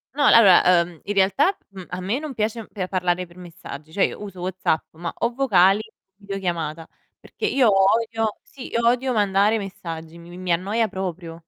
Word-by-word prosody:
No, 290 - +1
allora, 200 -6 +7
uhm, 170 -2 +2
in 205 - -2
realtà, 270 - +3
mhmm, 190 -2 -10
a 180 - -5
me 200 +8 -2
non 300 -3 -7
piace 220 0 -2
pe 185 -3 -5
parlare 180 -1 -1
per 170 0 -20
messaggi. 160 -4 -10
Cioè 190 - +1
io - - -6
uso 195 -3 -8
WhatsApp, 185 -3 -1
ma 170 +1 -5
o 235 +1 -1
vocali 200 -7 +4
o 220 0 -10 0.3
videochiamata. 175 -6 -4 0.3
Perché 435 - -6
io 260 - +3
odio 225 +2 +1
sì, 265 - -11
io 235 0 -1
odio 250 +2 +2
mandare 205 0 +2
messaggi, 170 -5 -7
mi 170 0 -14
mi 175 - -10
mi 185 -1 -3
annoia 210 +6 0
proprio. 175 -4 -6
195 Hz, 190 wpm, -22 LUFS, 175-225 Hz, 0.3 s, allora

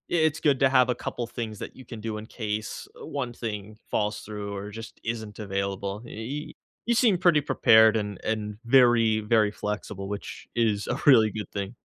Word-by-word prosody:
it's 160 -2 +2
good 140 -4 +2
to 135 - +6
have 130 -1 +4
a 125 - +2
couple 120 - -4
things 110 -3 -5
that - - -7
you 130 - -12
can 115 -2 -8
do 110 -1 -3
in 105 - -7
case, 110 -2 -4
uh, - - -7
one 130 -4 -3
thing 105 -3 -6
falls 105 0 0
through 105 -1 -6
or 100 +1 -6
just 115 +2 -9
isn't 110 -2 -4
available. 100 0 -3
Y 130 +9 -6 0.3
you 235 - +3
seem 225 -5 +4
pretty 170 -4 +4
prepared 110 -5 +5
and 105 -3 -2
and 105 -1 -2
very, 120 -3 +5
very 105 -1 +3
flexible, 105 -2 -5
which 105 0 -6
is 110 -3 +1
a 125 - -1
really 115 -7 +7
good 105 -3 -6
thing. 100 +3 -4
110 Hz, 190 wpm, -26 LUFS, 105-125 Hz, 0.3 s, really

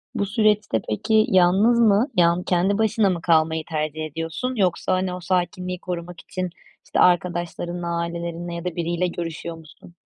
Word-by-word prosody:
Bu 200 - 0
süreçte 210 - +1
peki 215 - +2
yalnız 190 +6 +4
mı, 220 +1 +4
yal 170 -1 +5
yani 180 - -5
kendi 185 +3 +1
başına 220 -2 +2
mı 175 -2 -2
kalmayı 160 -1 +2
tercih 155 0 -2
ediyorsun 165 - -4
yoksa, 185 -3 +1
hani, 185 0 0
o 180 - -5
sakinliği 180 0 -2
korumak 175 -1 -6
için, 185 -1 -4 0.4
işte, - - -2
arkadaşlarınla, 175 0 +1
ailelerinle 170 0 -4
ya 170 +1 -6
da 180 - -3
biriyle 170 +1 -1
görüşüyor 170 -1 -5
musun? 165 +2 -16
175 Hz, 160 wpm, -23 LUFS, 170-190 Hz, 0.4 s, yal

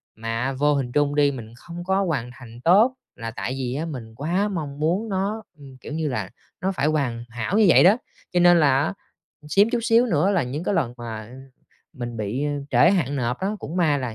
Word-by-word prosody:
mà 115 +4 -2
vô 145 +2 +2
hình 130 -3 -1
trung 145 0 +1
đi 145 -1 +4
mình 115 -4 -8
không 170 +8 -9
có 190 +2 +1
hoàn 140 -9 -2
thành 120 -1 -13
tốt 210 +9 +5 0.2
là 115 -1 -6
tại 130 - -4
vì 125 -2 -2
á 155 +4 -2
mình 120 -8 -7
quá 175 - 0
mong 150 -8 -5
muốn 180 +9 0
nó, 200 +3 -2
ưm, 135 -3 -13
kiểu 150 - -9
như 160 0 -1
là, 130 - -3 0.3
nó 190 +1 0
phải 150 -5 0
hoàn 130 -7 -1
hảo 120 - -2
như 215 - +6
vậy - - +7
đó. 195 +6 +6 0.4
Cho 175 - +3
nên 175 -1 +6
là 140 -3 +4
á 160 - -2 0.6
xém 200 +7 +4
chút 240 - 0
xíu 230 +2 +4
nữa 185 -4 +2
là 185 - +2
những 140 +7 -4
cái 205 - 0
lần 120 -7 0
mà 115 -1 -7 0.6
mình 120 -4 -6
bị, 110 +6 -2
ơ, 150 - 0 0.2
trễ 170 - +5
hạn 145 -8 0
nộp 125 -1 -1
á, 190 - -1
cũng 170 0 -6
may 155 -5 +3
là 125 -4 -4
145 Hz, 230 wpm, -23 LUFS, 125-180 Hz, 0.6 s, vậy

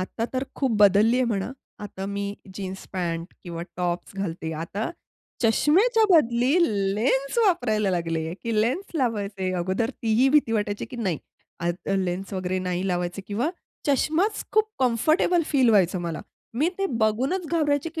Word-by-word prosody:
आता 225 +5 -3
तर 260 +1 -1
खूप 270 -3 +1
बदलली 205 +4 +5
आहे 255 - +3
म्हणा. 220 +2 -2 0.3
आता 195 -1 -6
मी 200 0 -3 0.3
जीन्स, 190 -1 -6
पॅन्ट 170 -1 -3
किंवा 170 -2 -6
टॉप्स 175 +2 -2
घालते. 165 -4 -3
आता 170 - -3 0.5
चष्म्याच्या 385 - +4
बदली 250 -4 +4 0.4
लेन्स 265 - +1
वापरायला 215 - +2
लागले 165 -2 -1
की 225 -2 +1
लेन्स 305 - -1
लावायचे. 205 - -1
अगोदर 190 +6 0
ती 225 - +1
ही 255 +4 +5
भीती 280 -5 +3
वाटायची 205 -1 -1
की - - -7
नाही 190 -10 -1 0.4
आता 175 +3 -2
लेन्स 190 +1 -2
वगैरे 185 -1 -1
नाही 180 0 -2
लावायचे 180 +2 -2
किंवा 230 +10 -1 0.4
चष्माच 315 +9 +1
खूप 435 0 +3
कम्फर्टेबल 310 +8 +3
फील 265 -5 +3
व्हायचं 185 -3 +3
मला. 170 -2 -4 0.3
मी 290 +8 +2
ते 390 - +1
बघूनच 260 - +1
घाबरायचे 300 -2 +1
की 320 - -3
215 Hz, 155 wpm, -25 LUFS, 185-270 Hz, 0.5 s, बदलली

